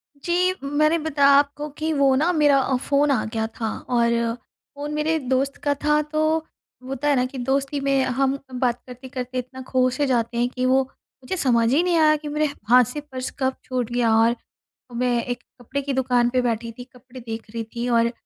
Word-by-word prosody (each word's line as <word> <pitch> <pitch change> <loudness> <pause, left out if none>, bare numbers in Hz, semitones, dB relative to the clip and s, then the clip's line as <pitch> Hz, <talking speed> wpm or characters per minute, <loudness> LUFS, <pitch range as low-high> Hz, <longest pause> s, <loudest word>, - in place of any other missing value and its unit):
जी, 355 +5 +1
मैंने 305 +3 +2
बताया 285 -2 +3
आपको 290 +1 0
कि 315 +1 -1
वो 275 -2 +3
ना 320 +6 +2
मेरा 295 -3 +4
अ, 265 0 0
फ़ोन 280 +2 +1
आ 250 - +1
गया 220 0 -2
था, 225 -1 -4 0.2
और 235 -1 +1 0.4
फ़ोन 290 +1 -5
मेरे 310 +2 +1
दोस्त 265 +1 -1
का 290 -1 +2
था, 300 +1 +1
तो 310 +1 0 0.5
होता 270 +2 -3
है 285 - +4
ना, 250 - +2
कि 260 +1 -7
दोस्ती 275 +3 -1
में 275 -1 +2
हम 270 +2 0 0.2
बात 245 -1 0
करते-करते 255 0 -7
इतना 255 +1 -5
खो 255 -1 +2
से 285 +3 -1
जाते 235 -2 0
हैं 240 +1 +2
कि 255 0 -3
वो 260 +1 +4 0.4
मुझे 370 +9 -3
समझ 235 -5 +2
ही 315 - +4
नहीं 350 -2 +2
आया 305 -1 +5
कि 300 0 -7
मेरे 300 +1 0 0.2
हाथ 250 +1 +7
से 295 - -4
पर्स 260 -3 -6
कब 260 0 0
छूट 250 -2 -3
गया। 240 -2 +2
और 230 +1 +4 0.6
मैं 245 -1 +1
एक 245 -1 -4 0.2
कपड़े 275 +4 -3
की 275 0 -3
दुकान 250 -2 +2
पे 255 0 +1
बैठी 230 -1 -2
थी, 245 - -7
कपड़े 255 0 -14
देख 225 -1 -6
रही 230 0 -4
थी, 235 +2 -5
और 235 0 +2
260 Hz, 205 wpm, -23 LUFS, 245-290 Hz, 0.6 s, हाथ